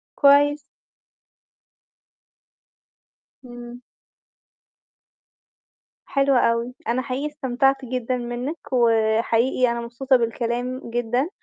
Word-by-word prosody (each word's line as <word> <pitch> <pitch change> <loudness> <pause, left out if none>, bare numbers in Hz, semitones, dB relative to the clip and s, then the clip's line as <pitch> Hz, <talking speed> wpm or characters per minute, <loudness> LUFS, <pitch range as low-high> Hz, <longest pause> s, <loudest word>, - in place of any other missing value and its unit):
كويس. 290 +1 +5 2.9
إمم. 240 0 -10 2.2
حلو 275 -1 +1
أوي. 235 +1 +1
أنا 245 +2 0
حقيقي 270 +3 -3
استمتعت 270 -1 0
جدًا 250 0 -2
منِّك 245 +6 -4 0.2
وحقيقي 230 +1 +2
أنا 235 0 -3
مبسوطة 245 +3 0
بالكلام 240 +1 -2
جدًا 240 +5 -1
245 Hz, 75 wpm, -22 LUFS, 235-270 Hz, 2.9 s, كويس